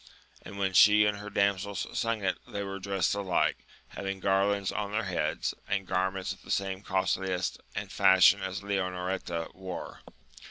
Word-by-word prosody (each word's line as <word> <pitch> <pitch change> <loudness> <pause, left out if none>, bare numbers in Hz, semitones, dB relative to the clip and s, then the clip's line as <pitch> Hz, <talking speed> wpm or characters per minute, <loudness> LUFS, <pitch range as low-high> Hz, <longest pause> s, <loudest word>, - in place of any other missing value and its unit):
And 100 - -10
when 95 -1 0
she 105 +2 +7
and 105 -1 0
her 105 0 -7
dam 100 -1 +2
sels 100 +1 -4
sung 115 -2 -1
it 95 -1 0
they 105 -4 -4
were 95 0 -5
dressed 95 -2 0
alike, 100 -3 0 0.2
having 95 0 -5
garlands 100 +1 +1
on 100 0 -3
their 110 +2 0
heads, 95 -3 -1
and 100 -1 -1
garments 95 +1 -1
of 95 - -17
the - - -16
same 95 -1 -1
costliness 95 -2 -1 0.2
and - - -4
fashion 95 +1 +6
as 95 +1 -4
Leonoreta 90 -3 -2
wore. 95 -2 -7
95 Hz, 165 wpm, -29 LUFS, 95-100 Hz, 0.2 s, she